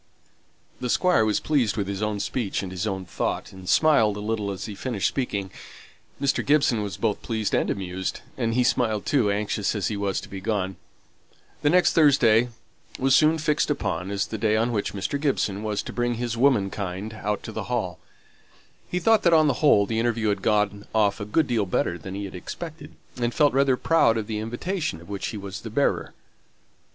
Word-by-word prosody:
The 125 - -3
Squire 180 -4 +3
was 110 -1 +1
pleased 130 -8 +1
with 100 -2 -1
his 100 0 -4
own 105 -1 -1
speech 100 -2 -2
and 95 - -6
his 95 +3 -3
own 95 -2 -3
thought, 85 - -3
and 95 -1 -9
smiled 115 -10 +4
a - - -5
little 105 -1 -2
as 95 -2 -5
he 105 - -6
finished 110 -1 -1
speaking. 100 -8 -2 0.7
Mr. 140 -1 +1
Gibson 140 -6 +3
was 100 -5 -4
both 110 -3 -1
pleased 110 -3 -2
and - - +1
amused; 95 -1 -3
and 115 -4 -1
he 125 - +3
smiled 110 -4 +1
too, 125 -8 +2
anxious 105 +1 -1
as 105 - -1
he 105 - -2
was 100 -1 -1
to - - -10
be 95 -1 -8
gone. 95 -2 -2 0.8
The 145 - +3
next 180 +2 +4
Thursday 125 -7 +5 0.5
was 135 0 +3
soon 155 +1 +4
fixed 155 0 +1
upon 100 - -2
as 100 0 -1
the 110 - -6
day 110 0 +2
on 115 +2 +1
which 105 -3 -2
Mr. 105 +8 -3
Gibson 105 -9 0
was 105 -1 -2
to - - -7
bring 120 0 0
his 120 0 -3
womenkind 105 -5 0
out 105 -1 -3
to - - -6
the - - -5
Hall. - - -2 0.9
He 180 - -2
thought 220 +5 +4
that, 170 - +4
on 155 -1 +6
the 140 -4 0
whole, 125 -9 +5
the 110 +2 -1
interview 115 -2 +1
had 100 -1 -1
gone 105 -1 0
off 105 -2 +2
a 105 - -4
good 150 +10 +2
deal 115 -7 0
better 85 -1 -1
than 95 +5 -7
he 100 0 -4
had 95 - -8
expected, 155 - -8 0.2
and 120 -1 -1
felt 150 -3 +4
rather 135 -1 +3
proud 155 -9 +3
of 110 - -2
the 105 0 -3
invitation 120 - -3
of 85 - -15
which 100 -1 -3
he 110 - -5
was 100 -1 -7
the 115 - -7
bearer. 140 +6 0
110 Hz, 205 wpm, -25 LUFS, 100-130 Hz, 0.9 s, on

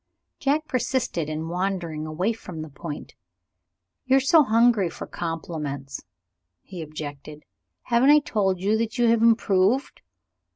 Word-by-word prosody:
Jack 300 +3 0
persisted 240 - -1
in 155 +1 -4
wandering 175 -3 -3
away 180 +9 -1
from 175 -7 -8
the 155 - -9
point. 145 +2 -8 0.9
"You 265 +1 +5
are - - +5
so 290 +5 +5
hungry 230 - +3
for - - -8
compliments," 150 -5 -5 0.6
he 180 -3 -8
objected. 150 -1 -8 0.4
"Haven't 240 +3 +3
I 300 - +8
told 205 - 0
you 200 +4 +1
that 225 +1 -2
you 240 -1 +3
have 230 -1 +3
improved? 225 +1 +2
190 Hz, 135 wpm, -24 LUFS, 155-235 Hz, 0.9 s, I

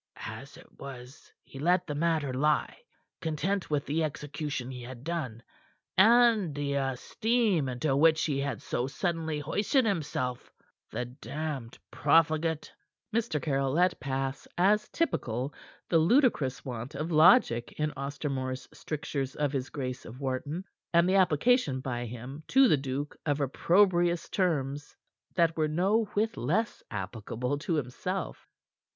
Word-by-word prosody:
As - - -8
it - - -18
was, 130 0 -10
he 135 - -11
let 180 +4 +2
the 150 - -4
matter 155 -3 0
lie, 150 +3 +1 0.5
content 180 +4 -1
with 145 -2 0
the 160 +3 0
execution 145 -3 -4
he 125 -1 -7
had 125 0 -9
done, 135 -9 -4 0.5
and 220 -5 +5
the 145 -1 -1
esteem 160 - +1
into 135 +3 0
which 160 +2 +4
he 140 -3 0
had 140 -6 -3
so 125 - -1
suddenly 160 +2 -2
hoisted 205 - +1
himself 145 - -2 0.4
the 125 - -3
damned 135 0 -5
profligate!" 155 +1 +2 0.4
Mr. 225 -9 0
Caryll 135 -3 0
let 180 +3 +2
pass, 135 +1 -3
as 210 +4 +3
typical, 130 - -1 0.3
the 165 - +4
ludicrous 165 - +2
want 120 0 -6
of 155 +4 -3
logic 155 - +5
in 150 0 0
Ostermore's 135 -2 -3
strictures 145 -3 -4
of 145 -2 0
his 135 -2 -2
Grace 130 -3 -4
of 120 +4 -10
Wharton, 140 +6 -3 0.3
and 170 +1 +4
the 190 +1 +4
application 185 - +3
by 120 -2 -3
him 125 +5 -8
to 265 0 +6
the 155 - +5
duke 135 +2 -4
of 145 0 +1
opprobrious 175 +4 +3
terms 145 -6 -1 0.4
that 165 -2 +3
were 155 -1 +1
no 195 +8 +2
whit 220 +2 0
less 195 - 0
applicable 115 +6 -3
to 165 +2 -1
himself. 125 - -4
150 Hz, 140 wpm, -29 LUFS, 130-170 Hz, 0.5 s, to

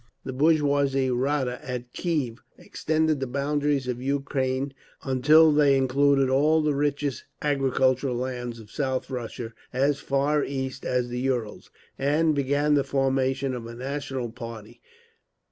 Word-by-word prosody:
The 130 - -4
bourgeois 145 0 +3 0.3
Rada 130 0 0
at 125 -1 -6
Kiev 145 -9 -2 0.2
extended 155 -1 0
the 135 - -2
boundaries 140 0 0
of 125 -1 -3
Ukraine 135 0 -1 0.3
until 150 +4 +5
they 145 -2 +4
included 135 +1 +3
all 150 +4 +3
the 150 -1 +2
richest 140 -2 -1
agricultural 135 -2 +1
lands 120 -1 -4
of 110 -1 -14
South 130 -2 -2
Russia, 120 -2 -5 0.2
as 140 +2 +1
far 140 +2 +1
east 130 -1 -4
as 125 -1 0
the 125 0 -3
Urals, 125 -5 -2 0.3
and 155 +3 +2
began 145 +1 +1
the 145 -1 +3
formation 135 0 0
of 120 -2 -6
a 115 - -8
national 130 -2 -4
army. 115 0 -8
135 Hz, 135 wpm, -26 LUFS, 125-145 Hz, 0.3 s, until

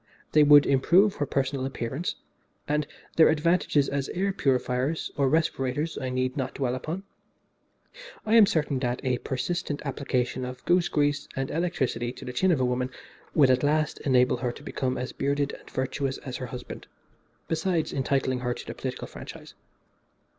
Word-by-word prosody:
They 155 - +5
would 145 -1 +8
improve 175 +9 +4
her 145 - -1
personal 135 0 -1
appearance, 135 +4 -3 0.5
and 150 0 0 0.3
their 160 - +7
advantages 155 -2 +2
as 140 -1 -2
air 195 +2 -1
purifiers 130 -1 0
or 140 -2 +2
respirators 155 -1 0
I 130 - -3
need 130 +1 -1
not 130 -3 -3
dwell 130 -3 -1
upon. 155 +9 -4 1.2
I 215 - +1
am 225 -3 +8
certain 150 -6 0
that 125 -1 -1
a 125 -2 0
persistent 145 +2 -2
application 130 -2 -1
of 125 0 -7
goose 175 0 +3
grease 145 -1 +1
and 135 0 -2
electricity 150 -8 -1
to - - -10
the 125 - -5
chin 185 +9 +3
of 160 - +2
a 130 - +2
woman 125 +1 0 0.5
would 135 -4 +6
at 130 0 +3
last 150 +1 +1
enable 125 -2 +3
her 125 0 -2
to - - -12
become 130 -2 -2
as 125 0 -4
bearded 140 0 0
and - - -12
virtuous 130 +1 -2
as 130 -3 -6
her 130 - -5
husband, 125 0 -8 0.6
besides 165 0 0
entitling 135 -1 0
her 125 -1 -2
to - - -8
the - - -6
political - - -5
franchise. - - -10
140 Hz, 170 wpm, -27 LUFS, 130-155 Hz, 1.2 s, would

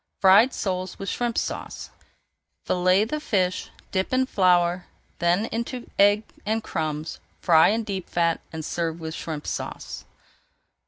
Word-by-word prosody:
FRIED 200 +7 +7
SOLES 185 -4 -3
WITH 195 - -4
SHRIMP 240 -1 -1
SAUCE - - -4 0.7
Fillet 185 +3 +3
the 305 +7 -3
fish, 185 -9 0 0.2
dip 190 -1 -1
in 260 0 +3
flour, 180 -5 +2 0.3
then 175 +5 +2
into 235 +2 -4
egg 205 +2 +5 0.2
and 220 +1 -1
crumbs, 155 -4 -3 0.2
fry 160 -3 +6
in 225 +2 +1
deep 195 -4 -5
fat, 170 -1 +1
and 160 -1 -5
serve 165 -1 -2
with 160 -1 -5
Shrimp 155 -2 -5
Sauce. - - -5
185 Hz, 140 wpm, -25 LUFS, 170-215 Hz, 0.7 s, FRIED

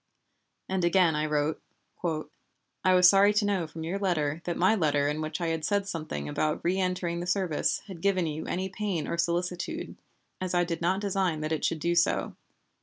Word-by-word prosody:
And 190 -1 -1
again 175 -2 +4
I 155 +1 0
wrote: 150 +1 0 0.4
"I 165 +3 -2
was 180 0 +7
sorry 200 +2 +6
to 210 - +3
know 195 -5 0
from 160 +1 -8
your 180 +5 -2
letter 165 -5 0
that 175 - -2
my 185 +5 +4
letter 145 -7 +2
in 150 +1 -1
which 155 +1 -3
I 170 -1 -1
had 160 -1 -2
said 200 +4 0
something 155 - -4
about 150 - -1
reëntering 180 -1 0
the 175 - -4
service 185 -5 0
had 185 -5 -9
given 195 -3 +2
you 155 0 -4
any 185 +2 -2
pain 190 -5 -3
or 170 - -3
solicitude, 175 +1 -2 0.5
as 185 -1 -2
I 175 - +4
did 170 -1 -3
not 185 +3 +1
design 190 -6 0
that 155 +1 -3
it 160 - -1
should 165 - 0
do 170 +2 +1
so. 175 0 +1
175 Hz, 195 wpm, -28 LUFS, 155-185 Hz, 0.5 s, was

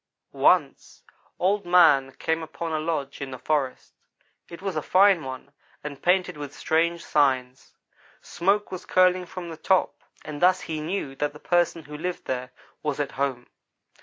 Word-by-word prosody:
"Once - - +1 0.3
Old 200 +3 +1
man 165 -7 +5
came 160 +4 -1
upon 160 +1 -5
a 155 - 0
lodge 155 -4 -3
in 135 - -4
the 130 - -7
forest. 140 -1 -2 0.6
It 170 - -9
was 195 -2 -4
a 155 - 0
fine 190 +1 +4
one, 130 +1 -8 0.3
and 145 -2 -7
painted 180 -2 +1
with 145 -1 -7
strange 170 +1 0
signs. 130 -3 0 0.4
Smoke 200 +4 0
was 185 -1 -7
curling 185 -1 +3
from 175 -1 -7
the 160 - -8
top, 185 +3 +1 0.2
and 150 -1 -7
thus 185 +1 +4
he 155 -2 -4
knew 155 -4 -3
that 145 0 -1
the 150 - -12
person 175 -1 +1
who 150 +1 -10
lived 175 +4 -4
there 125 -1 -4 0.3
was 150 -2 -2
at 145 - -1
home. 130 -3 -2
160 Hz, 165 wpm, -25 LUFS, 140-180 Hz, 0.6 s, man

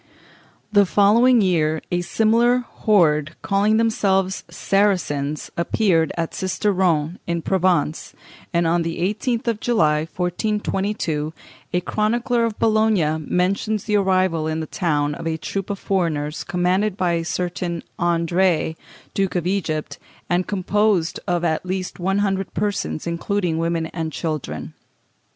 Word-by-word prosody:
In 205 - +6
the 200 - +6
following 230 +6 +5
year 160 -5 +2
a 175 0 +1
similar 230 +6 +2
horde, 155 -7 +2
calling 205 +2 +2
themselves 195 -4 +1
Saracens, 170 -6 0
appeared 170 -2 +1
at 165 -1 -2
Sisteron, 185 -4 0
in 170 -1 -2
Provence; 180 -5 0 0.4
and 170 0 +1
on 170 +1 +2
the 165 0 -3
18th. 225 +7 -1
of 230 -2 0
July, 155 -11 +2
1422, 180 -3 -2 0.4
a 180 - +1
chronicler 235 +5 0
of 225 -2 -3
Bologna 215 -8 +2
mentions 190 +6 0
the 210 -1 +1
arrival 185 -5 +1
in 160 0 -1
that 155 - -7
town 150 -4 0
of 165 - -6
a 160 -1 -1
troop 195 +4 -4
of 200 - -2
foreigners, 160 -6 -1
commanded 185 +3 0
by 180 -2 +1
a 165 -1 0
certain 175 0 -3 0.2
André, 170 -1 +1 0.4
Duke 195 -1 -1
of 175 -2 0
Egypt, 170 -5 -2 0.3
and 180 +1 0
composed 200 -2 +1
of 175 -1 0
at 160 -2 0
least 185 0 -4
one 190 +2 0
hundred 195 -1 -2
persons, 205 -6 -2
including 170 0 -1
women 165 0 0
and 160 -1 -4
children. 150 - -4
180 Hz, 135 wpm, -22 LUFS, 165-205 Hz, 0.4 s, In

